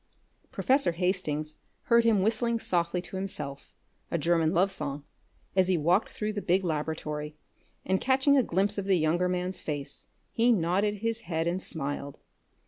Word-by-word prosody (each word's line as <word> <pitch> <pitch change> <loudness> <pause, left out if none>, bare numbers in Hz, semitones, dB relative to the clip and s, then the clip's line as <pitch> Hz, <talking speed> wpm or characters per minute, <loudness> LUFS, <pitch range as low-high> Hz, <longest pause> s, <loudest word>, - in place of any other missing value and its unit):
Professor 265 -9 +2
Hastings 165 -4 -1 0.3
heard 235 0 +4
him 215 -4 +4
whistling 230 +2 +1
softly 175 -4 -1
to 190 - -7
himself 140 -8 -5 0.4
a - - 0
German 165 0 +2
love 190 +2 +2
song 145 -5 -4 0.5
as 185 -1 +4
he 185 -2 +2
walked 175 +7 +2
through 215 0 -3
the 205 - -3
big 185 +1 +2
laboratory, 150 -2 -3 0.5
and 190 +1 +1
catching 270 +2 +3
a 270 - +6
glimpse 200 0 0
of 195 - -4
the 195 -2 +3
younger 170 +3 +1
man's 180 0 -2
face, 145 -2 -6 0.2
he 235 +2 +3
nodded 200 +1 +1
his 230 0 0
head 165 -5 -2
and 175 +2 -1
smiled. 140 -4 -4
180 Hz, 160 wpm, -28 LUFS, 160-205 Hz, 0.5 s, a